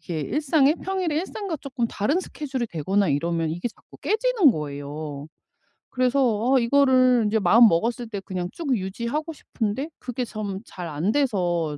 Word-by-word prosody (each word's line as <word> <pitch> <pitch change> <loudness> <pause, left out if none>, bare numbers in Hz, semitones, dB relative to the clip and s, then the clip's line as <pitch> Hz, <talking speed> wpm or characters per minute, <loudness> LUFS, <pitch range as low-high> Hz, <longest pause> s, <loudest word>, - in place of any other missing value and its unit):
이렇게 165 -4 -4
일상에 295 - +2
평일에 370 -3 -2
일상과 380 0 -3
쪼끔 265 -4 -3
다른 280 - 0
스케줄이 270 -8 -4
되거나 190 +2 0
이러면 165 +3 0
이게 175 +8 -3
자꾸 - - -19
깨지는 440 - +3
거예요. 145 -1 -6 0.6
그래서 255 -2 +1
아 - - +6
이거를 255 -1 +4
이제 220 +1 +1
마음먹었을 230 +4 +4
때 205 -3 -4
그냥 185 -2 -4
쭉 285 -6 -1
유지하고 235 - -3
싶은데 255 0 -3
그게 250 0 -4
좀 210 -4 -5
잘 180 -6 -7
안 160 +6 -1
돼서 175 - 0
235 Hz, 345 characters per minute, -24 LUFS, 175-280 Hz, 0.6 s, 아